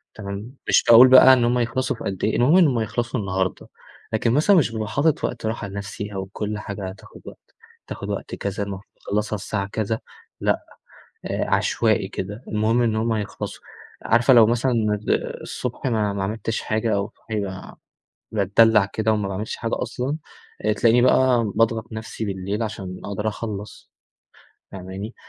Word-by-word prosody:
تمام، 100 Hz, +3 st, -7 dB
مش -, -, +4 dB
باقول 120 Hz, +2 st, +10 dB
بقى 130 Hz, 0 st, +9 dB
إن 125 Hz, -2 st, +3 dB
هم 120 Hz, +1 st, +2 dB
يخلصوا 125 Hz, +2 st, -1 dB
في -, -, -10 dB
قد 95 Hz, -2 st, -4 dB
إيه، 110 Hz, -, +1 dB
المهم 140 Hz, +9 st, +4 dB
إنهم 150 Hz, -9 st, +4 dB
هيخلصوا 120 Hz, +3 st, -2 dB
النهاردة. 95 Hz, -2 st, -2 dB, 0.5 s
لكن 115 Hz, +1 st, +1 dB
مثلًا 155 Hz, +9 st, +4 dB
مش 145 Hz, -9 st, +3 dB
بابقى 110 Hz, -2 st, -3 dB
حاطط 150 Hz, +5 st, +1 dB
وقت 120 Hz, -, -3 dB
راحة 110 Hz, -2 st, -3 dB
لنفسي 100 Hz, +1 st, -6 dB
أو 95 Hz, -1 st, -4 dB
كل 105 Hz, 0 st, -3 dB
حاجة 100 Hz, -2 st, -6 dB
هتاخد 95 Hz, +1 st, -13 dB
وقت -, -, -14 dB, 0.3 s
تاخد -, -, -6 dB
وقت -, -, -4 dB
كذا 100 Hz, 0 st, -3 dB
المفروض 100 Hz, -1 st, -6 dB
تخلصها 105 Hz, +1 st, -2 dB
الساعة 100 Hz, 0 st, -3 dB
كذا، 110 Hz, +2 st, -2 dB, 0.4 s
لأ، -, -, 0 dB, 0.6 s
آآ -, -, -2 dB
عشوائي -, -, +1 dB
كده، 105 Hz, +6 st, -6 dB
المهم 110 Hz, +3 st, +1 dB
إن 115 Hz, -2 st, +1 dB
هم 110 Hz, +1 st, 0 dB
هيخلصوا. 105 Hz, -2 st, -5 dB, 0.4 s
عارفة 120 Hz, +3 st, +4 dB
لو 115 Hz, -3 st, +8 dB
مثلًا 120 Hz, +3 st, +1 dB, 0.4 s
آآ -, -, 0 dB
الصبح 125 Hz, +2 st, -5 dB
ما 110 Hz, -5 st, +1 dB
ما 100 Hz, -1 st, -2 dB
عملتش 110 Hz, +2 st, -3 dB
حاجة 110 Hz, 0 st, 0 dB
أو 100 Hz, +2 st, -2 dB
صاحي 100 Hz, -4 st, -4 dB, 0.7 s
باتدلع 110 Hz, +1 st, +4 dB
كده 110 Hz, +2 st, 0 dB
وما 105 Hz, -2 st, -1 dB
باعملش 100 Hz, +3 st, -4 dB
حاجة 115 Hz, -1 st, -2 dB
أصلًا، 125 Hz, +5 st, -3 dB, 0.5 s
آآ 105 Hz, -, +3 dB
تلاقيني 115 Hz, +3 st, +4 dB
بقى 125 Hz, -4 st, +3 dB
باضغط 115 Hz, +1 st, 0 dB
نفسي 110 Hz, 0 st, -5 dB
بالليل 100 Hz, +2 st, -3 dB
عشان 95 Hz, -4 st, -5 dB
أقدر 100 Hz, +2 st, -2 dB
أخلص. 105 Hz, -1 st, -7 dB, 0.8 s
فاهماني؟ 95 Hz, +4 st, -7 dB
110 Hz, 165 wpm, -23 LUFS, 100-120 Hz, 0.8 s, باقول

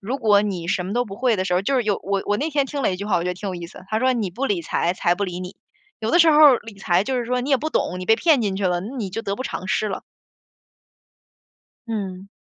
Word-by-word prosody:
如 235 Hz, +7 st, -3 dB
果 210 Hz, -5 st, +4 dB
你 185 Hz, -5 st, -3 dB
什 180 Hz, 0 st, 0 dB
么 195 Hz, -, -4 dB
都 245 Hz, 0 st, +1 dB
不 195 Hz, -1 st, -8 dB
会 245 Hz, -1 st, +2 dB
的 185 Hz, -, -1 dB
时 180 Hz, -, -2 dB
候， 180 Hz, -, +3 dB
就 275 Hz, +7 st, 0 dB
是 255 Hz, -, +2 dB
有 205 Hz, -2 st, +1 dB
我 200 Hz, 0 st, -1 dB
我 205 Hz, -, +1 dB
那 305 Hz, -, -1 dB
天 285 Hz, -2 st, +1 dB
听 285 Hz, +1 st, -4 dB
了 210 Hz, -, +2 dB
一 -, -, -3 dB
句 200 Hz, -, -6 dB
话， 205 Hz, -, +2 dB
我 170 Hz, -, 0 dB
觉 -, -, -1 dB
得 -, -, -4 dB
挺 195 Hz, +2 st, -6 dB
有 185 Hz, -, -4 dB
意 175 Hz, -1 st, -6 dB
思， -, -, -13 dB
它 215 Hz, +1 st, 0 dB
说： 255 Hz, +2 st, +3 dB
“你 225 Hz, -5 st, -1 dB
不 245 Hz, +10 st, -4 dB
理 195 Hz, -7 st, 0 dB
财， 170 Hz, +2 st, 0 dB
财 175 Hz, -1 st, +1 dB
不 200 Hz, +3 st, -2 dB
理 180 Hz, -1 st, -5 dB
你。” 185 Hz, +1 st, -8 dB, 0.4 s
有 220 Hz, 0 st, -1 dB
的 345 Hz, -, +4 dB
时 330 Hz, -2 st, +7 dB
候， 295 Hz, -3 st, +8 dB
理 225 Hz, -2 st, -10 dB
财 185 Hz, 0 st, +1 dB
就 260 Hz, +3 st, -1 dB
是 245 Hz, -, -1 dB
说 250 Hz, +1 st, 0 dB
你 260 Hz, -, -4 dB
也 270 Hz, -, +5 dB
不 310 Hz, +5 st, -4 dB
懂， 180 Hz, -, -1 dB
你 185 Hz, -, -6 dB
被 225 Hz, -, +5 dB
骗 305 Hz, -3 st, +3 dB
进 200 Hz, -3 st, -1 dB
去 195 Hz, -1 st, 0 dB
了， 175 Hz, -1 st, 0 dB
那 225 Hz, +9 st, -7 dB
你 215 Hz, -6 st, -3 dB
就 225 Hz, -, -4 dB
得 200 Hz, -2 st, -3 dB
不 255 Hz, -, -4 dB
偿 185 Hz, -, -5 dB
失 215 Hz, -, +1 dB
了。 195 Hz, -, -4 dB, 1.9 s
嗯。 195 Hz, -3 st, -5 dB
205 Hz, 330 characters per minute, -22 LUFS, 185-250 Hz, 1.9 s, 候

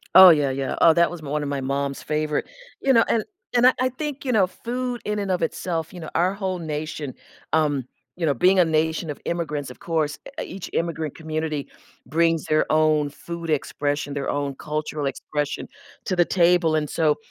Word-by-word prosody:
Oh, 185 Hz, 0 st, +12 dB
yeah, 145 Hz, -4 st, +4 dB
yeah. 135 Hz, 0 st, -2 dB
Oh, 165 Hz, -, +8 dB
that 170 Hz, +1 st, +3 dB
was 175 Hz, -2 st, -7 dB
1 150 Hz, 0 st, -2 dB
of 145 Hz, -, -3 dB
my 140 Hz, -1 st, -2 dB
mom's 140 Hz, +1 st, -2 dB
favorite` 150 Hz, 0 st, -1 dB, 0.4 s
you 270 Hz, -, +4 dB
know, 230 Hz, -2 st, +6 dB
and 225 Hz, -, +2 dB, 0.3 s
and 240 Hz, 0 st, +5 dB
I 255 Hz, -, +6 dB
I 255 Hz, 0 st, +2 dB
think, 285 Hz, +2 st, -5 dB
you 255 Hz, -, +1 dB
know, 200 Hz, -6 st, +4 dB
food 245 Hz, +4 st, -4 dB
in 210 Hz, 0 st, -1 dB
and 200 Hz, -2 st, -2 dB
of 180 Hz, -, 0 dB
itself, 165 Hz, 0 st, -2 dB
you 180 Hz, -, -8 dB
know, 160 Hz, -, -7 dB
our 180 Hz, +3 st, +3 dB
whole 190 Hz, -2 st, -3 dB
nation, 150 Hz, -3 st, -4 dB, 0.4 s
um, 145 Hz, -5 st, +2 dB, 0.3 s
you 175 Hz, -, -2 dB
know, 145 Hz, -, +3 dB
being 185 Hz, +9 st, +4 dB
a 180 Hz, -, +6 dB
nation 160 Hz, 0 st, 0 dB
of 145 Hz, -, -5 dB
immigrants, 150 Hz, -5 st, -2 dB
of -, -, -14 dB
course, 160 Hz, -5 st, -1 dB, 0.2 s
e -, -, -2 dB
each 185 Hz, 0 st, -7 dB
immigrant 160 Hz, -3 st, -2 dB
community 155 Hz, -2 st, -3 dB, 0.4 s
brings 165 Hz, 0 st, +2 dB
their 155 Hz, 0 st, +2 dB
own 155 Hz, -1 st, +3 dB
food 170 Hz, +3 st, -7 dB
expression, 145 Hz, -1 st, -1 dB
their 140 Hz, -1 st, -2 dB
own 140 Hz, -1 st, -2 dB
cultural 150 Hz, 0 st, -3 dB
expression 145 Hz, +1 st, -3 dB, 0.4 s
to 185 Hz, -, 0 dB
the 175 Hz, -, +4 dB
table, 170 Hz, -3 st, +3 dB
and 150 Hz, -2 st, 0 dB
so, 155 Hz, -2 st, +2 dB
160 Hz, 200 wpm, -24 LUFS, 150-180 Hz, 0.4 s, Oh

